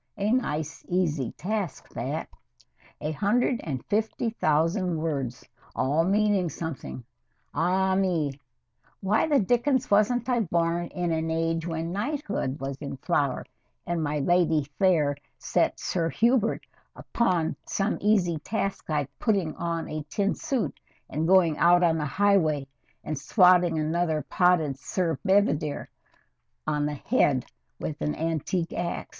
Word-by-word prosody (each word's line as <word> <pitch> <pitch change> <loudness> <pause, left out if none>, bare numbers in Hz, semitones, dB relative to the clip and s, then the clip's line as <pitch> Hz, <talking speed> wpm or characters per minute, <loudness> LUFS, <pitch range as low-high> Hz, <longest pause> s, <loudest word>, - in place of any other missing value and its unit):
"A 205 +2 0
nice, 160 - -1
easy 160 -8 0
task 200 -2 -4
that. - - -4 0.7
A 155 - -2
hundred 225 - +1
and 135 -6 -4
fifty 220 +2 -1
thousand 165 0 +1
words, 140 -6 -3 0.3
all 145 +5 +2
meaning 200 -2 +2
something. 160 -6 -6 0.5
Ah 185 +4 +2
me! 165 -8 0 0.6
Why 205 +9 +2
the 290 -3 +4
dickens 245 +4 +1
wasn't 225 +4 +3
I 250 -2 +2
born 170 -3 0
in 175 -1 -2
an 160 0 -1
age 165 +1 -1
when 165 0 -3
knighthood 210 - -2
was 135 0 -4
in 140 -2 -6
flower 140 -3 0 0.4
and 170 -2 -1
my 150 0 -1
Lady 165 0 +2 0.2
Fayre 155 -7 +3 0.2
set - - 0
Sir 165 -3 -1
Hubert 230 +3 +2 1.0
some 200 +2 -1
easy 190 -6 +2
task 195 +2 -3
like 150 -3 0
putting 195 -9 +1
on 170 -1 -3
a 155 0 -4
tin 200 +3 +1
suit 255 -6 -2 0.3
and 155 +3 -1
going 175 -4 +4
out 175 +1 +5
on 165 -2 +3
the 150 - -1
highway 160 -5 +2 0.4
and 155 -2 -3
swatting 180 +1 +4
another 155 0 0
potted 165 -7 +2
Sir 165 -2 -1
Bedivere 160 -7 +1 0.8
on 150 -1 0
the 150 - -3
head 140 - +1 0.3
with 150 -1 -5
an 150 - -1
antique 165 +2 -2
ax? 175 0 -3
170 Hz, 135 wpm, -27 LUFS, 155-200 Hz, 1.0 s, out